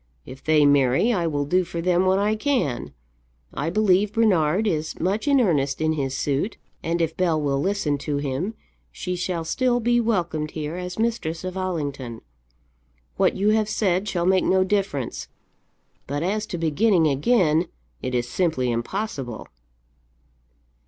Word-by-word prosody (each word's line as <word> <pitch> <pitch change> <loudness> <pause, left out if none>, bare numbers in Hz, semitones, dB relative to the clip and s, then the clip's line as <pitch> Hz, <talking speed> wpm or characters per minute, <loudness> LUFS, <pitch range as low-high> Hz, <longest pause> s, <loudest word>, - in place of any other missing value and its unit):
If 130 +1 -11
they 155 -2 +4
marry, 140 - +3
I 175 -5 0
will 145 -2 -1
do 185 +6 +2
for 170 -1 -6
them 180 +1 +2
what 190 +1 +3
I 210 +2 +1
can. 225 - -1 0.6
I 145 +4 -2
believe 200 +1 +2
Bernard 195 -4 +2
is 155 -6 -2
much 195 - -1
in 280 -1 +5
earnest 145 - +1
in 160 0 +1
his 135 -3 -2
suit, 145 +9 -1 0.2
and 170 +1 0
if 160 0 -2
Bell 170 -4 +1
will 140 -2 0
listen 155 -4 0
to 145 0 -2
him, 145 +10 -3 0.4
she 180 -1 -4
shall 180 -2 -2
still 245 +8 +1
be 240 +1 +2
welcomed 170 -9 -1
here 155 +1 -3
as 180 0 -5
mistress 220 -8 -1
of 185 0 -5
Allington. 145 -10 -4 1.0
What 190 - +3
you 200 +2 +2
have 215 0 +2
said 195 -2 0
shall 175 -2 -1
make 185 0 +3
no 190 0 +3
difference; 190 - -2 0.8
but 145 +3 -2
as 210 +4 -1
to 175 - -4
beginning 165 +3 +2
again, 160 - +2 0.3
it 130 - -3
is 120 0 0
simply 145 -7 0
impossible." 125 - -4
175 Hz, 160 wpm, -23 LUFS, 145-200 Hz, 1.0 s, in